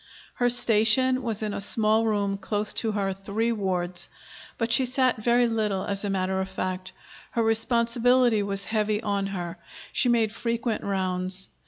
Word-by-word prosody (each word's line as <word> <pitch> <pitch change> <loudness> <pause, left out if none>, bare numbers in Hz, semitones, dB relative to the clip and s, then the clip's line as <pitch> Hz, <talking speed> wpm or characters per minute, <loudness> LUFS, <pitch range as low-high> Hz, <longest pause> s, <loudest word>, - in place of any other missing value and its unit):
Her 245 - +4
station 245 +2 +4
was 225 -3 -2
in 210 -1 -3
a - - -3
small 220 +2 +2
room 200 -2 -1
close 210 +1 0
to 220 -2 0
her 195 -2 -1
three 200 +4 -2
wards. 180 -4 -2 0.5
But 230 0 -2
she 250 +3 +5
sat 255 0 +1
very 240 +2 +3
little, 215 -4 -1
as 200 0 -1
a 205 - -2
matter 190 0 -1
of 190 - -5
fact. 185 0 -4 0.4
Her 230 - +1
responsibility 235 +1 +2
was 200 -1 -2
heavy 215 -1 -1
on 200 -1 -1
her; 175 -3 -6 0.3
she 250 - +3
made 225 -3 +1
frequent 230 -1 -3
rounds. 185 -1 -1
215 Hz, 165 wpm, -25 LUFS, 195-230 Hz, 0.5 s, she